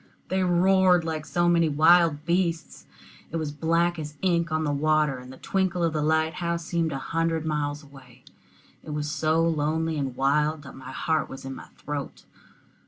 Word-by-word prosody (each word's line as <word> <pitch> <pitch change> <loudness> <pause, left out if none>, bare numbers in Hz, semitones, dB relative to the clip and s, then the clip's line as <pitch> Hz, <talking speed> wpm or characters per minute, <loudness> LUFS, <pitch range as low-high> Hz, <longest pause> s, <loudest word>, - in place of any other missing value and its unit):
They 190 +1 0
roared 180 0 +4
like 155 -2 -4
so 175 +5 +1
many 170 -2 +3
wild 160 0 +4
beasts. 170 -2 -1 0.4
It 165 - -3
was 155 -2 -2
as - - -8
black 170 +2 +1
as 150 -1 -7
ink 170 -3 +1
on 155 0 0
the 150 - 0
water, 150 -1 +1
and 125 +1 -11
the 130 - -12
twinkle 185 0 -1
of 165 -1 +1
the 155 - -1
light 160 +1 +1
house 170 -1 -2
seemed 165 -2 -1
a 135 - -3
hundred 165 +2 -1
miles 150 -1 -2
away. 135 -4 -16 0.6
It 150 - -6
was 150 0 -3
so 160 +2 +1
lonely 160 0 0
and 135 -3 -3
wild 150 +3 +1
that 140 - -11
my 130 -1 -10
heart 160 +2 -1
was 135 - -9
in 135 - -5
my - - -10
throat. 145 -1 -6
160 Hz, 190 wpm, -26 LUFS, 145-170 Hz, 0.6 s, roared